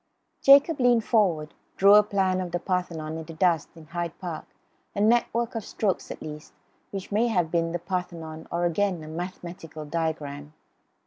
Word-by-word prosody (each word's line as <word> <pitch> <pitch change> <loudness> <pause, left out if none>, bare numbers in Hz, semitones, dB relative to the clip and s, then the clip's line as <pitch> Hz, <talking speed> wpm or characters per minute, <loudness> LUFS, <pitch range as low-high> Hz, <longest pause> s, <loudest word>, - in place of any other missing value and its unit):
Jacob, 280 +3 +6
leaning 245 -2 +5
forward, 185 -10 +1 0.2
drew 200 +1 +7
a 210 - +9
plan 190 -3 0
of 180 -2 -5
the 175 - 0
Parthenon 165 -4 -2
in 160 - -7
the 165 - -9
dust 170 -3 +2
in 165 -1 -13
Hyde 170 0 -4
Park, 170 -4 -6 0.5
a - - -2
network 235 +2 +2
of 225 -2 -3
strokes 200 -2 -2
at - - -7
least, 150 0 -9 0.4
which 195 0 -6
may 220 +4 +2
have 180 -8 +1
been 165 -1 +1
the 175 - -1
Parthenon, 170 -3 -5
or 175 +1 0
again 175 -1 0
a - - -9
mathematical 170 -2 -7
diagram. 150 -2 -3
175 Hz, 175 wpm, -26 LUFS, 160-200 Hz, 0.5 s, a